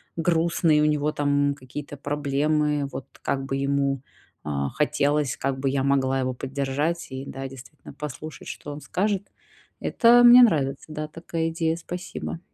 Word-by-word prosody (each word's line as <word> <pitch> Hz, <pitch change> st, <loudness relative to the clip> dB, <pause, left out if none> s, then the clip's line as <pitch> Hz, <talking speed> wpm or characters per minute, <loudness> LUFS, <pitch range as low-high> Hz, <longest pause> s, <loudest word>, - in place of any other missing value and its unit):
грустный, 165 Hz, -2 st, +2 dB
у -, -, +4 dB
него 150 Hz, 0 st, +1 dB
там 145 Hz, -1 st, +1 dB
какие-то 145 Hz, +2 st, -8 dB
проблемы, 145 Hz, +1 st, 0 dB
вот 135 Hz, -, -7 dB, 0.2 s
как 135 Hz, 0 st, -1 dB
бы 135 Hz, -, -2 dB
ему, 140 Hz, -1 st, 0 dB, 0.4 s
а, 70 Hz, -2 st, -2 dB
хотелось, 150 Hz, -1 st, +1 dB
как 135 Hz, 0 st, -1 dB
бы 135 Hz, 0 st, 0 dB
я 135 Hz, 0 st, 0 dB
могла 135 Hz, -1 st, +2 dB
его 130 Hz, 0 st, -1 dB
поддержать 140 Hz, +6 st, -2 dB
и, 130 Hz, +1 st, -5 dB
да, 135 Hz, 0 st, -6 dB
действительно 135 Hz, +3 st, -13 dB
послушать, 150 Hz, +1 st, -7 dB
что 145 Hz, -, -7 dB
он 145 Hz, -, -6 dB
скажет. 200 Hz, +3 st, -1 dB, 0.6 s
Это 240 Hz, 0 st, +5 dB
мне 245 Hz, +1 st, +10 dB
нравится. 140 Hz, -, +2 dB
Да, 155 Hz, 0 st, -4 dB
такая 165 Hz, 0 st, -3 dB
идея, 160 Hz, 0 st, 0 dB
спасибо. 175 Hz, 0 st, -6 dB
145 Hz, 155 wpm, -25 LUFS, 135-160 Hz, 0.6 s, мне